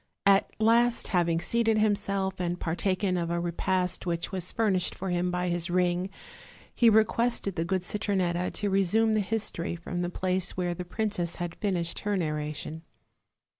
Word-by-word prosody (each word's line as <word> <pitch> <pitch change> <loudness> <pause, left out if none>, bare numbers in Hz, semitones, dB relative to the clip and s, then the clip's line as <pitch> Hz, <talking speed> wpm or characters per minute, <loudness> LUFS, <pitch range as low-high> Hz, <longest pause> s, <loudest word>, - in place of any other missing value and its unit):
At 195 0 +5
last, 235 +2 +3
having 170 -3 +2
seated 225 +3 +1
himself, 200 -3 0
and 175 0 -2
partaken 185 +3 0
of 170 -1 -1
a 170 0 0
repast 180 +1 -1
which 170 -1 -2
was 185 -2 -3
furnished 200 -5 +1
for 190 -1 -4
him 175 0 0
by 180 0 -1
his 175 +1 -1
ring, 180 +1 +1 0.6
he 235 - +5
requested 220 -2 +2
the 165 - -1
good 185 +1 -1
Citronetta 185 -3 0
to 205 -2 -1
resume 210 +4 +3
the 215 - +3
history 205 -5 -2
from 175 +1 -4
the 175 - -1
place 185 0 -1
where 175 -1 0
the 180 +1 -6
princess 180 -3 -2
had 175 -1 -4
finished 175 -5 -2
her 205 -1 -1
narration. 150 -1 -3
185 Hz, 165 wpm, -28 LUFS, 175-205 Hz, 0.6 s, At